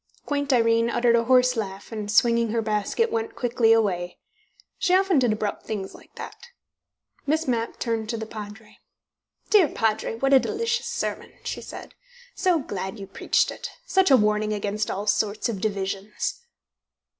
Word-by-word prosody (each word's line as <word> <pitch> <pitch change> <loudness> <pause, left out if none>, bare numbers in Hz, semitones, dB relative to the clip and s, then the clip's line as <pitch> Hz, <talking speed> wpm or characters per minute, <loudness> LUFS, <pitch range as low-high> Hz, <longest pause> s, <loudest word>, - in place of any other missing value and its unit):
Quaint 285 -1 -1
Irene 230 -1 +3
uttered 235 0 +3
a 230 0 +2
hoarse 250 0 +4
laugh, 200 -2 -5
and, 210 -2 -4
swinging 235 +1 +3
her 225 +1 0
basket, 215 - 0
went 450 -2 -2
quickly 240 -6 +2
away. 185 -6 +1 0.6
She 365 -1 +3
often 380 -5 +3
did 245 -3 +2
abrupt 215 -1 -2
things 200 -3 -4
like - - -17
that. 475 - -9 0.8
Miss 315 +2 +1
Mapp 230 -2 -1
turned 225 -2 -2
to 230 - -2
the 220 - -4
Padre. 215 0 -10 0.7
"Dear 400 -7 +6
Padre, 225 -2 -1
what 270 +4 +1
a 270 - +9
delicious 460 - -1
sermon!" - - -4
she - - -4
said. - - -9 0.4
"So 365 -3 +2
glad 195 -7 -5
you 200 - -7
preached 195 - +1
it! - - -7 0.2
Such 380 -5 +3
a 265 - +7
warning 210 -1 +1
against 210 +1 -2
all 200 +2 -3
sorts 210 +1 0
of 200 -5 -4
divisions!" 200 - -3
225 Hz, 165 wpm, -25 LUFS, 210-270 Hz, 0.8 s, a